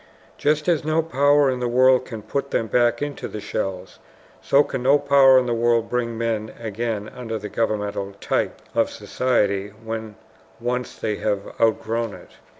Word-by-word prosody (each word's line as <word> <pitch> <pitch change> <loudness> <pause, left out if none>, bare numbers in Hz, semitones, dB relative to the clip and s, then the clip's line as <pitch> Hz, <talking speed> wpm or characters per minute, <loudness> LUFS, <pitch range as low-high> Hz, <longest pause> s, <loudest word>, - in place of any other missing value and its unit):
Just 150 +2 +1
as 170 -4 +2
no 155 +1 +1
power 145 -2 +3
in 130 - -3
the 125 - -1
world 130 +1 +4
can 110 -4 -8
put 140 +6 -3
them 115 - 0
back 120 +3 +2
into 145 -1 -5
the 105 - -7
shells, 95 -3 -4 0.4
so 140 +1 +4
can 135 - -4
no 135 +3 +5
power 140 -2 +6
in 130 - +3
the 120 - 0
world 115 0 +1
bring 120 -2 -1
men 110 -2 -2
again 110 -1 -3
under 115 -3 -5
the 105 0 -7
governmental 105 -2 -2
type 100 - -2
of - - +2
society 105 -6 0
when 110 0 -7 0.4
once 125 +1 -3
they 105 -1 -2
have 100 -2 -2
outgrown 115 0 0
it. - - -15
115 Hz, 170 wpm, -23 LUFS, 110-130 Hz, 0.4 s, power